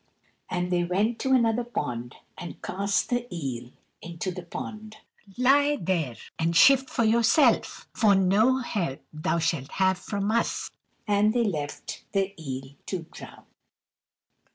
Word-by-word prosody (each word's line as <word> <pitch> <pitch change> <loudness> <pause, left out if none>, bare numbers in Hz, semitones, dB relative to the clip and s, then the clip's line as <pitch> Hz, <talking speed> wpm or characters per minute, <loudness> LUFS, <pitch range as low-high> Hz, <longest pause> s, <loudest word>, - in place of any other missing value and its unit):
And 180 0 -2
they 175 -1 +2
went 205 +7 0
to 265 - -1
another 235 -1 +3
pond, 125 - -4 0.2
and 175 - -8
cast 200 +3 -1
the 245 0 -1
eel 130 -8 -5 0.3
into 170 +2 -4
the 180 - -6
pond. 215 +5 -8 0.4
"Lie 285 +4 +4
there 165 - -1 0.2
and 165 +1 0
shift 265 +7 +6
for 230 - 0
yourself, 230 +6 +3
for 210 -4 +4
no 200 +7 +4
help 175 - -3
thou 155 +2 -1
shalt 160 -4 -1
have 190 -1 +2
from 200 0 -2
us;" 230 +1 -1 0.4
and 210 +1 +3
they 240 - +3
left 155 -9 -4
the 195 -1 0
eel 135 -3 -6 0.2
to 185 -4 -3
drown. - - -11
195 Hz, 140 wpm, -26 LUFS, 165-230 Hz, 0.4 s, shift